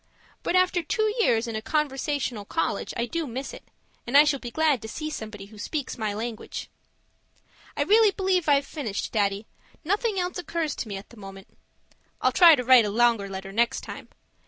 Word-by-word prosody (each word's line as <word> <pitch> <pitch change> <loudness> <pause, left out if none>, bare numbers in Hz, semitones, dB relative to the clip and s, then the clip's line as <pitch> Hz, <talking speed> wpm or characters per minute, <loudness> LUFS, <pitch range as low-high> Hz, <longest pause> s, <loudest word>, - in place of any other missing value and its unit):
But - - -1
after 365 -1 +3
two 435 +5 0
years 230 - +3
in 230 - -4
a 220 - -3
conversational 270 -2 -2
college, 325 - -2
I 235 - 0
do 325 +5 -3
miss 265 +3 -5
it; - - -11 0.4
and 260 +4 +4
I 290 - +9
shall 295 -2 +1
be 240 - -6
glad 300 -1 +1
to 220 - -7
see 310 +7 -5
somebody 215 -6 -7
who 210 +1 -15
speaks 285 +5 -4
my 215 -3 -2
language. 225 +1 -6 1.1
I - - +2
really 435 +1 +5
believe 375 -4 0
I've 280 -1 +4
finished, 235 -12 -4
Daddy. 200 -1 0 0.4
Nothing 405 +4 0
else 360 0 -2
occurs 335 -4 -2
to - - -4
me 200 -2 -5
at 195 - -12
the 235 - -15
moment 195 -1 -12 0.6
I'll - - +2
try 340 -3 +8
to 250 - -3
write 250 -2 +6
a - - -1
longer 225 -2 +2
letter 195 0 -7
next 230 +3 +1
time. - - -9
255 Hz, 195 wpm, -26 LUFS, 220-325 Hz, 1.1 s, I